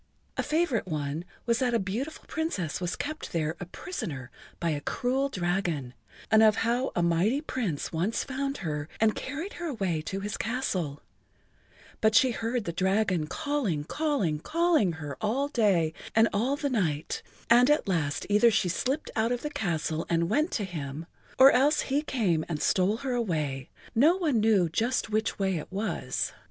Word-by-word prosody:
A - - 0
favorite 300 - 0
one 155 0 -3 0.2
was 235 -1 +2
that 250 -3 +1
a - - +3
beautiful 225 +11 -4
Princess 200 - -2
was 175 0 -1
kept 310 +2 -5
there 160 -1 0
a 180 - -6
prisoner 145 - -6 0.3
by 170 -1 0
a 145 -1 -2
cruel 265 - 0
dragon, 175 - -1 0.4
and 220 - +7
of 215 -1 +6
how 245 +3 +1
a 175 - +2
mighty 175 +10 +2
Prince 225 - -3
once 180 +8 0
found 275 +1 -3
her 150 -1 -3
and 220 -1 +4
carried 310 +9 -5
her 340 - -2
away 195 - -1
to 190 +5 -4
his 205 0 -3
castle, 185 - -2 1.0
but 220 0 +3
she 255 +3 +6
heard 230 +1 -2
the 170 - -4
dragon 190 -2 +1
calling, 275 - -1
calling, 250 - 0
calling 320 - +2
her 150 -4 -6
all 260 +7 0
the - - -27
day 185 -9 +3 0.2
and 225 +1 +6
all 250 +7 +1
the[Pg - - -12
46] 285 -2 0
night, 160 -9 -1 0.3
and 245 +3 +7
at 295 -6 +3
last 150 -6 0
either 210 +3 +5
she 195 -4 +1
slipped 260 - -1
out 225 +1 +1
of 245 -1 -2
the 300 - -3
castle 165 - -2
and 170 0 +1
went 305 +4 +2
to 210 - 0
him 155 -4 -5 0.3
or 270 +1 +9
else 290 +4 +3
he 280 +2 0
came 205 - 0
and 155 -3 -2
stole 190 +7 +2
her 260 - 0
away, 155 - -1 0.2
no 300 +10 +5
one 305 -11 +1
knew 210 -5 +4
just 225 +6 0
which 215 +1 0
way 190 -3 0
it 155 - -7
was. 205 +3 -2
210 Hz, 180 wpm, -28 LUFS, 170-260 Hz, 1.0 s, or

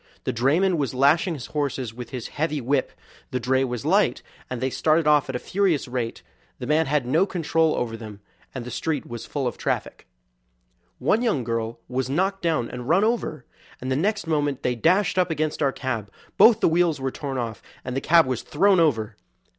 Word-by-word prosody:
The - - -2
drayman 160 - +2
was 135 -4 -2
lashing 155 +6 +3
his 125 -5 -7
horses 135 -6 -3
with 125 +1 -8
his 125 -4 -6
heavy 155 0 -1
whip; 135 +1 0 0.4
the 125 - -2
dray 130 +2 +1
was 125 -3 -4
light, - - +2 0.3
and 125 - -4
they 130 +1 -1
started 155 +3 +2
off 150 -2 +4
at 130 - -3
a - - +1
furious 180 0 0
rate; 120 -2 -4 0.3
the - - -6
man 150 +3 +2
had 145 -2 +1
no 160 +10 +2
control 165 -3 +1
over 115 -2 -2
them, 110 -3 -9 0.4
and 125 -2 -5
the 125 - -7
street 155 -4 -2
was 120 -1 -7
full 140 -3 -3
of 120 - -3
traffic. - - -3 0.9
One 220 - +2
young 215 - +1
girl 115 0 -3
was 130 0 -2
knocked 190 +7 0
down 160 -8 0
and 125 +2 -7
run 185 +5 +4
over, 215 - -1 0.3
and 130 +1 -4
the - - +2
next 200 +5 0
moment 145 -4 -1
they 125 - +1
dashed 180 - +2
up 180 - +2
against 155 -1 -2
our 140 -2 +3
cab; 115 -7 -4 0.2
both 225 -1 +6
the - - +5
wheels 165 -3 +2
were 135 0 -2
torn 135 -1 -5
off 115 -3 -4 0.2
and 125 0 -4
the 135 - -1
cab 165 0 +5
was 130 -2 -2
thrown 190 +4 +3
over. 115 -10 +1
140 Hz, 205 wpm, -24 LUFS, 125-165 Hz, 0.9 s, both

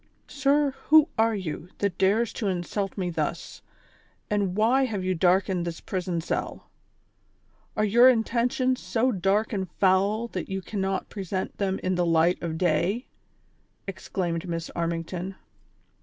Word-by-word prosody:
" - - -41
Sir, 280 +1 +2 0.2
who 310 +1 +7
are 225 0 +2
you, 180 -3 -5
tliat 200 -3 -1
dares 210 +4 +2
to 215 - -3
insult 195 +2 -2
me 180 -2 -1
thus, - - -4 0.7
and 200 -3 0
why 240 +6 +3
have 210 -6 -3
you 185 0 +1
darkened 185 +1 +2
this 170 -1 -5
prison 180 -3 -3
cell? - - -4 1.1
Are 215 - +3
your 240 +5 +7
intentions 250 +2 +1
so 245 +3 0
dark 200 +2 +1
and 190 -3 -2
foul 200 +4 +2
that - - -5
you 190 0 -2
cannot 195 -1 -2
present 190 -2 -4
them 195 -1 0
in 185 - +1
the 175 -1 +1
light 165 +1 +3
of 160 -2 -3
day 180 +1 +2
V" - - -34 0.8
exclaimed 175 -2 -3
Miss 165 0 -4
Armington. 170 +2 -3
195 Hz, 150 wpm, -26 LUFS, 180-225 Hz, 1.1 s, who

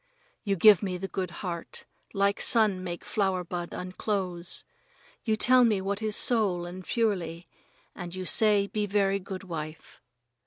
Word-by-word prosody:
You 200 -2 0
give 205 +1 +6
me 185 -3 -3
the 195 +2 -5
good 190 -2 -4 0.2
heart, 170 -2 -6 0.3
like 200 0 0
sun 210 -5 +2
make 175 -1 -6
flower 190 -3 -1
bud 175 0 -5
unclose. 185 -2 -2 0.6
You 220 -2 +1
telled 250 +2 +5
me 210 -3 +1
what 200 +2 -3
is 215 -1 +1
soul 200 -8 +3
and 180 +2 -8
purely, 180 -7 -2 0.5
and 175 0 -7
you 185 0 -5
say 210 0 +4
be 210 +1 -3
very 200 -1 +1
good 190 0 -8
wife. 155 -3 -8
195 Hz, 155 wpm, -27 LUFS, 180-210 Hz, 0.6 s, give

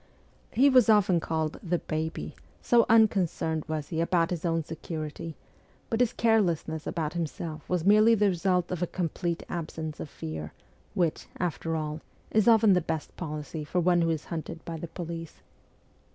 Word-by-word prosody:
He 265 +4 +4
was 255 -4 +5
often 200 -5 +5
called 160 -1 -2
'the 175 0 0
Baby,' 160 0 -4 0.2
so 235 -1 +4
unconcerned 185 -8 +3
was 155 -2 -3
he 165 -1 -1
about 170 0 +2
his 170 -2 -3
own 165 -1 +1
security: 160 0 -6 0.6
but 225 - +1
his 245 -2 +3
carelessness 175 -8 +1
about 160 -3 -2
himself 160 -2 -5
was 180 -2 0
merely 215 +3 +6
the 205 -1 +3
result 180 0 +1
of 180 -2 -3
a 180 - +1
complete 170 -1 -2
absence 160 -2 -5
of 155 - -6
fear, 80 - -6 0.4
which, 170 -3 0
after 165 -2 -2
all, 155 0 -3 0.3
is 215 0 +3
often 220 -3 +6
the 180 - +3
best 160 -2 -4
policy 155 -1 -5
for 165 +5 -1
one 175 0 +3
who 165 - +2
is 160 -2 -2
hunted 165 0 -6
by 165 - -5
the 165 +1 -6
police. 165 -1 -7
170 Hz, 165 wpm, -28 LUFS, 160-185 Hz, 0.6 s, merely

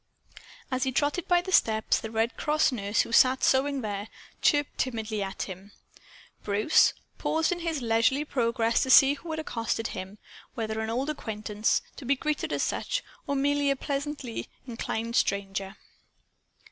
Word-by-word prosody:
As 255 0 -1
he 260 0 +1
trotted 290 +6 0
by 350 -1 +3
the 375 - -5
steps, 220 -10 +3
the 220 - -6
Red 225 +1 0
Cross 300 -1 +2
nurse, 205 -3 0
who - - -5
sat 255 +2 +5
sewing 270 +1 +2
there, 205 -1 -4 0.3
chirped 290 -1 +2
timidly 220 -4 -2
at 195 -1 -3
him. 195 +2 -9 0.7
Bruce 210 +8 +4 0.3
paused 320 +2 +1
in 350 - -1
his 325 -6 -2
leisurely 230 +6 +2
progress 230 -4 +1
to 260 - -1
see 270 +2 +8
who 325 +4 -10
had 315 0 -3
accosted 230 -6 -2
him 190 +3 -7 0.4
whether 220 -1 -3
an 220 0 -2
old 260 +6 -1
acquaintance, 215 -5 -1
to 270 - -9
be 275 +3 +3
greeted 300 +3 -2
as - - 0
such, - - -2 0.2
or 280 - 0
merely 285 +1 +2
a 275 - +2
pleasantly 280 -3 -4 0.2
inclined 230 -1 -4
stranger. 195 0 -1
245 Hz, 160 wpm, -28 LUFS, 220-285 Hz, 0.7 s, see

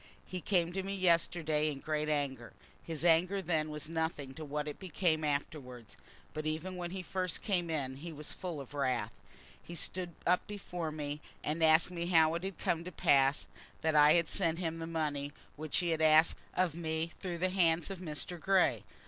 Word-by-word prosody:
He 180 -1 -5
came 175 0 +1
to 190 - -1
me 195 +1 -3
yesterday 165 -4 +2
in 145 - -4
great 155 +1 -1
anger. 135 -5 -2 0.3
His 165 0 -4
anger 175 +4 +4
then 160 -4 0
was 150 0 -5
nothing 160 -4 -2
to 155 - -7
what 150 0 -3
it 150 - -5
became 175 -3 0
afterwards; 140 -5 -3 0.4
but 155 0 -3
even 160 +4 -3
when 175 -1 -4
he 185 +1 -5
first 185 -1 -2
came 175 -4 0
in 135 -5 -2
he 165 +4 -7
was 150 -1 -5
full 175 -5 -5
of 140 +1 -9
wrath. 130 -6 0 0.5
He 170 - -9
stood 175 -1 -3
up 180 +1 +2
before 180 -5 -4
me, 150 -1 -4 0.2
and 155 +2 -1
asked 160 +2 +5
me 170 -1 -3
how 160 -2 +5
it 170 +1 -3
had 195 -2 -4
come 165 0 0
to 180 - -6
pass 140 -3 +3 0.4
that 160 -1 +1
I 150 0 +7
had 170 -2 +3
sent 165 -4 0
him 165 -2 -3
the 165 - -4
money 145 -3 -2 0.2
which 155 -1 -1
he 175 - +1
had 160 -1 0
asked 155 +1 +5 0.2
of 180 -4 +2
me 160 0 -2
through 180 -3 -4
the 185 +2 +1
hands 175 -1 +2
of 190 - -6
Mr. 170 +1 -4
Grey. 190 +2 +3
160 Hz, 200 wpm, -33 LUFS, 150-175 Hz, 0.5 s, I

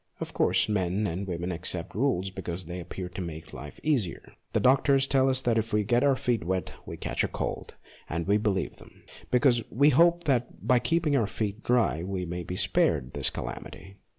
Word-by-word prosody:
Of - - -6
course, - - +2
men 100 0 0
and 95 +2 -3
women 90 0 -3
accept 85 0 -3
rules 95 -5 0
because 90 -1 -5
they 90 +2 -6
appear 90 +1 -6
to 90 +1 -6
make 80 -2 -7
life 70 +3 -9
easier. 125 - -1 0.2
The - - +3
44 - - -3
MONOLOGUES - - -5
doctors 135 +1 +4
tell 135 -1 +3
us 130 0 +1
that 115 -2 +2
if 110 +1 -3
we 105 0 +3
get 120 +5 +2
our 140 -2 +4
feet 120 -5 0
wet 95 +2 -2
we - - -6
catch - - -1
a - - +1
cold, - - -4 0.3
and 80 +1 -2
we 100 +2 +3
believe 105 -3 -1
them, - - -17 0.3
because 125 -1 +4
we 140 +5 +4
hope 170 +2 +4
that 125 -5 -1
by 125 -1 +4
keeping 165 0 +1
our 115 -6 +2
feet 105 0 -3
dry 120 -10 +2
we 90 0 -3
may 90 +1 -4
be 90 +1 -5
spared 65 -7 +1
this - - +1
calamity. 95 +1 -8
105 Hz, 210 wpm, -28 LUFS, 90-130 Hz, 0.3 s, doctors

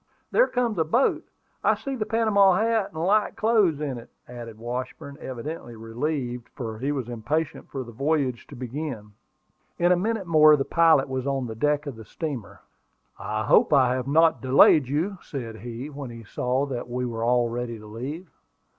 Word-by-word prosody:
"There - - +4
comes 235 -6 -1
a - - +4
boat. 235 - +1 0.4
I - - +4
see 275 -1 -5
the 220 -4 -3
Panama 215 -4 +4
hat 220 0 +1
and 160 0 -4
light 210 +2 +2
clothes 210 -9 +2
in 140 -5 -3
it," 115 - -14 0.2
added 120 -2 -9
Washburn, 125 +4 -6
evidently 130 0 -6
relieved, 120 +1 -4
for 110 -3 -5
he 135 +4 -1
was 135 -5 -3
impatient 130 +7 -3
for 135 -2 -4
the 120 - -11
voyage 135 0 -1
to 145 - -11
begin. 125 -3 -5 0.7
In 175 +1 +3
a - - +6
minute 210 +2 -1
more 155 -2 +7
the 135 -2 -1
pilot 165 -5 +4
was 130 0 -3
on 135 -2 -1
the 115 - -5
deck 150 +6 0
of 140 -6 -6
the 110 - -10
steamer. 135 -3 -6 0.6
"I 110 0 -2
hope - - +4
I 130 -3 +5
have 130 0 -3
not 160 +3 +4
delayed 135 +1 +6
you," 170 +8 -1
said 115 -6 -6
he, 120 +5 -7
when 140 -2 -7
he 115 -1 -10
saw 125 +5 -1
that 125 -3 -5
we 125 +1 -2
were 115 -2 -3
all 120 0 +3
ready 120 0 -4
to 105 - -13
leave. 135 - -6
135 Hz, 190 wpm, -25 LUFS, 120-160 Hz, 0.7 s, more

